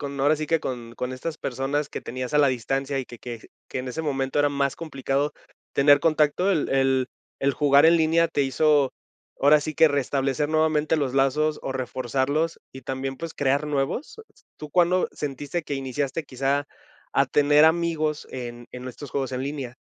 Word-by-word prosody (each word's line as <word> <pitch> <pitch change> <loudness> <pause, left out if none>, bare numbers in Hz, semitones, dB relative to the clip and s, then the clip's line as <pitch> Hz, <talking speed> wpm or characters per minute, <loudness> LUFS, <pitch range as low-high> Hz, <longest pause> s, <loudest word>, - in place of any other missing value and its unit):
con, 140 -1 -5
ahora 145 +3 +4
sí 155 0 -4
que 165 - +3
con 120 -5 -6
con 125 0 -3
estas 150 +5 -5
personas 140 +3 -2
que - - -6
tenías 130 +3 -5
a - - +5
la 145 -1 +5
distancia 135 +3 -1
y 130 - -2
que 120 -1 -12
que 120 -2 -8 0.2
que - - -4
en 130 - -5
ese 160 +6 -4
momento 135 -2 0
era 145 - +3
más 140 -1 0
complicado 140 -2 -2 0.4
tener 145 +1 +5
contacto, 155 +4 +2
el 165 -7 +1
el 135 -1 +2 0.3
¿el 140 0 +1
jugar 140 +1 +5
en 170 +1 +6
línea 165 +1 +3
te 160 -3 0
hizo 140 0 +2 0.5
ahora 150 +2 +5
sí 155 +1 -4
que 160 +1 +6
restablecer 140 0 0
nuevamente 155 0 +2
los 140 -4 -1
lazos 150 +3 +1
o - - -3
reforzarlos 130 +5 -1
y 130 - -10
también, 135 +1 -4
pues, 165 +1 -6
crear 140 +2 +1
nuevos? 145 - -2 0.4
¿Tú 150 -1 -9
cuándo 180 +2 +3
sentiste 145 +3 -4
que 145 - -4
iniciaste 135 +3 -3
quizá 135 +1 -1 0.5
a - - +3
tener 145 +1 +4
amigos 160 -2 +1
en 120 -2 -7
en 125 0 -7
estos 135 +2 -9
juegos 135 -2 -1
en 130 0 -3
línea? 135 -4 -5
140 Hz, 185 wpm, -25 LUFS, 135-155 Hz, 0.5 s, en